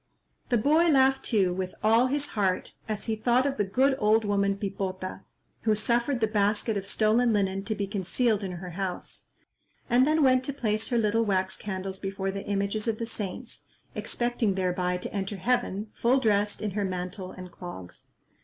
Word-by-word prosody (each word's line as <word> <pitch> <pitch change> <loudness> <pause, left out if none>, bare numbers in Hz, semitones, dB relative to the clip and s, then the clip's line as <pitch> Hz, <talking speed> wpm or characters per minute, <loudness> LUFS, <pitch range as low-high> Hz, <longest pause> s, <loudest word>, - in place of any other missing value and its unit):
The 245 - +3
boy 310 +9 +4
laughed 270 -2 +4
too 195 -6 +2
with 185 0 -4
all 225 +4 +5
his 285 +2 0
heart, 190 -3 -1 0.2
as 215 -1 -3
he 225 - 0
thought 240 +4 +2
of 275 -1 -1
the 205 - +2
good 260 +8 +2
old 215 +1 +3
woman 200 -1 +1
Pipota, 190 -2 -4 0.4
who 220 -1 +2
suffered 235 +4 +1
the - - +5
basket 210 +1 +1
of 195 -1 -3
stolen 225 +3 +3
linen 195 -1 0
to 215 - -1
be 200 -1 -2
concealed 205 +2 0
in 185 -2 -3
her 180 +1 -7
house, 185 +1 -5 0.6
and 250 +3 +5
then 310 0 +3
went 255 -1 +4
to 280 - -3
place 220 -4 -1
her 240 - +1
little 225 0 +2
wax 190 -3 0
candles 190 -1 -5
before 195 0 -3
the 195 0 -6
images 200 +2 -1
of 225 -1 0
the 230 - -3
saints, 225 +1 -6 0.3
expecting 240 -4 -1
thereby 180 -1 0
to 180 - -7
enter 195 0 -2
heaven 215 -1 -1
full 250 +3 +2
dressed 210 -3 +1
in 210 - -1
her 205 +1 -1
mantle 185 0 -4
and 185 -1 -10
clogs. 95 - -9
210 Hz, 185 wpm, -27 LUFS, 190-235 Hz, 0.6 s, all